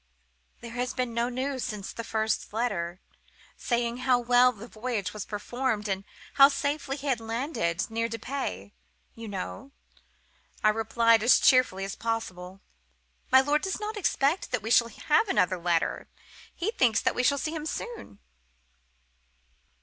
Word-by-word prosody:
"'There 235 - -8
has 245 +1 -3
been 250 -2 -2
no 235 +1 0
news 260 +1 -3
since 210 -5 -5
the 230 - -6
first 220 -1 -1
letter, 185 -7 -2 0.6
saying 235 -1 -1
how 255 0 +3
well 245 +1 +4
the 225 0 -11
voyage 225 -4 -3
was 210 -2 -5
performed, 220 +1 -2
and 195 0 -2 0.4
how 275 - +12
safely 285 0 -2
he 285 - -9
had 260 -5 +1
landed—near 225 - -2
Dieppe, 225 - -5 0.4
you 230 0 -9
know,' 205 +6 -6 0.9
I 215 - +6
replied 225 +1 +3
as 240 +3 +6
cheerfully 255 -7 +4
as 195 - -5
possible. 195 -5 -4 0.7
'My 260 +1 +8
lord 290 +2 +1
does 385 +2 -3
not 430 +1 -4
expect 335 -4 0
that 250 -4 -2
we 225 - -3
shall 235 -1 +5
have 305 - +1
another 185 - +1
letter; 170 -1 0 0.4
he 385 +6 -2
thinks 235 - +3
that - - +1
we - - 0
shall 280 +3 +3
see 310 +3 -3
him 310 -1 -4
soon. 470 - -6
235 Hz, 150 wpm, -28 LUFS, 210-265 Hz, 0.9 s, how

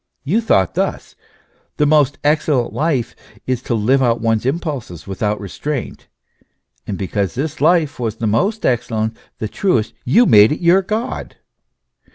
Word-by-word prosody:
You 195 +11 +1
thought 95 - +2
thus: - - -2 0.6
the 150 - +3
most 145 -2 +3
excellent 145 -4 +1
life 145 -6 -1 0.3
is, 130 -2 -1
to 120 - -2
live 125 +6 +2
out 120 -2 +2
one's 115 +1 0
impulses 135 - -4
without 105 +2 -2
restraint; 125 +7 -5 0.8
and 100 - -3
because 100 0 -2
this 150 +3 -4
life 155 -3 +2
was 115 -3 -2
the 115 - -4
most 195 - 0
excellent, 110 -2 0 0.2
the 110 - -3
truest, 120 - 0
you 230 - +4
made 105 - +6
it 150 - -2
your 180 +2 +4
God. 215 +5 -4
130 Hz, 150 wpm, -18 LUFS, 110-155 Hz, 0.8 s, made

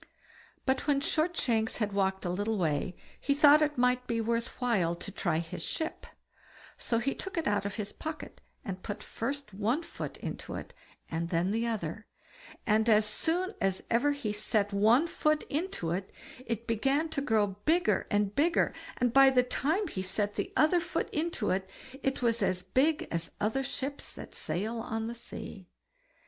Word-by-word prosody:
But 265 +2 +1
when 285 -2 +4
Shortshanks 285 -8 +1
had 210 -3 -1
walked 190 -1 0
a 175 - 0
little 205 +4 -1
way, 165 0 0 0.2
he 280 - +1
thought 295 +1 +7
it 300 -2 +1
might 250 0 +2
be 230 -1 0
worth 230 +1 -1
while 200 -9 +2
to 200 - -7
try 170 -5 0
his 165 0 -4
ship; 320 - -3 0.7
so 230 - -1
he 275 +4 0
took 385 -2 -6
it 330 - 0
out 205 -1 +1
of 200 - -5
his 210 -2 -4
pocket, 315 0 -7 0.2
and 185 -2 -5
put 205 +1 -5
first 275 -1 -4
one 225 - 0
foot - - -6
into - - -6
it, - - -7 0.4
and 165 +1 -2
then 175 +2 +1
the 230 +2 0
other; 210 -2 -3 0.6
and 220 +1 +3
as 215 -1 +6
soon 345 - -1
as 195 -2 0
ever 285 +5 +3
he 225 -8 -3
set 210 -1 0
one 220 +9 +5
foot 305 -2 +1
into 295 - -2
it, 190 +2 -3 0.4
it 230 0 -2
began 270 +8 +1
to 310 -3 -2
grow 220 -6 +3 0.2
bigger 320 - +3
and 205 -1 +1
bigger, 325 +7 +2 0.2
and 245 -2 +1
by 270 0 +8
the 255 -1 +4
time 315 +10 0
he 190 - -4
set 205 +2 0
the 370 - -3
other 315 +3 +5
foot 330 -1 -2
into 305 -8 -1
it, 190 0 -1 0.3
it 270 -1 -1
was 230 -1 +2
as 185 -2 +1
big 270 +11 +2
as 165 0 -2
other 220 +6 0
ships 275 +1 -4
that - - -10
sail 220 +6 -2
on 225 0 -3
the 230 - -3
sea. 210 -5 -8
230 Hz, 180 wpm, -30 LUFS, 200-285 Hz, 0.7 s, by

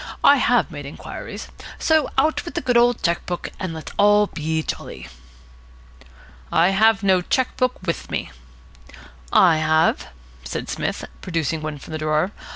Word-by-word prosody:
I 285 - +7
have 245 -7 +2
made 145 -3 -7
inquiries. 145 - -8 0.3
So 315 -3 +2
out 305 +4 +2
with 340 - -8
the 345 - -1
good 245 -4 0
old 240 0 +4
cheque 170 0 +1
book, 175 -1 -4
and 185 -3 -3
let's 160 -1 -7
all 205 +1 +5
be 160 -3 -2
jolly." - - -6 1.4
"I 170 +3 +4
have 215 +1 +3
no 190 -2 +4
cheque 255 +8 0
book 255 0 +1
with 170 - -3
me." - - -3 1.0
"I 170 -4 +5
have," 155 0 +2 0.4
said - - -5
Psmith, - - -3 0.2
producing 165 -3 -2
one 155 -1 -4
from 150 - -11
a 155 - -3
drawer. 155 +4 0
180 Hz, 160 wpm, -22 LUFS, 160-235 Hz, 1.4 s, I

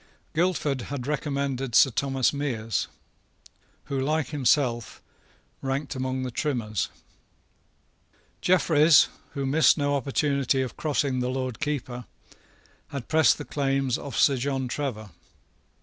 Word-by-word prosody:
Guildford 155 -5 0
had 140 -3 -4
recommended 140 -3 -2
Sir 135 - +6
Thomas 135 +1 +1
Meres, 120 -7 -2 1.0
who, 140 - -3
like 155 +3 0
himself, 130 -4 +1 0.6
ranked 135 +2 -2
among 130 0 -2
the 130 - -4
Trimmers. 115 - -2 1.5
Jeffreys, 160 -4 +5 0.3
who 140 -1 -2
missed 140 +2 +4
no 145 -1 +1
opportunity 140 -1 +1
of 125 - -6
crossing 140 -4 0
the 125 0 -1
Lord 130 -2 -3
Keeper, 130 -4 -3 0.8
had 140 -4 -7
pressed 160 -1 +4
the - - -7
claims 135 -3 0
of 140 -4 -6
Sir 140 -2 +4
John 135 0 -1
Trevor. 120 -7 -4
135 Hz, 120 wpm, -26 LUFS, 130-145 Hz, 1.5 s, Sir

